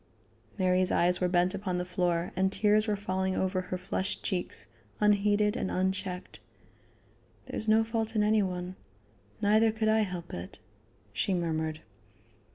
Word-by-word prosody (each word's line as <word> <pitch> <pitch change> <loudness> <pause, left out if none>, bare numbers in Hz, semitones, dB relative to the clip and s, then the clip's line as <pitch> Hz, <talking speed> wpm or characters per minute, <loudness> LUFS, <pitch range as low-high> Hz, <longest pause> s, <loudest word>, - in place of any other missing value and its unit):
Mary's 185 -1 +2
eyes 180 +1 +2
were 180 - +3
bent 180 +1 +2
upon 190 -2 -2
the 180 - -2
floor, 180 -1 0
and 190 0 +2
tears 215 +1 +3
were 210 - +1
falling 190 -1 -1
over 185 0 0
her 185 0 -4
flushed 190 +2 -3
cheeks, 185 -4 -2 0.3
unheeded 210 0 +3
and 220 -6 -2
unchecked. 190 0 -2 1.1
"There - - -7
is 220 - -5
no 220 +1 +5
fault 225 0 -2
in 210 - +3
any 215 0 +3
one; 180 -1 -3 0.7
neither 215 +2 +4
could 220 0 0
I 220 0 +4
help 180 -5 -3
it," 90 +1 -7 0.6
she 190 - 0
murmured. 160 -2 -2
190 Hz, 155 wpm, -29 LUFS, 180-210 Hz, 1.1 s, no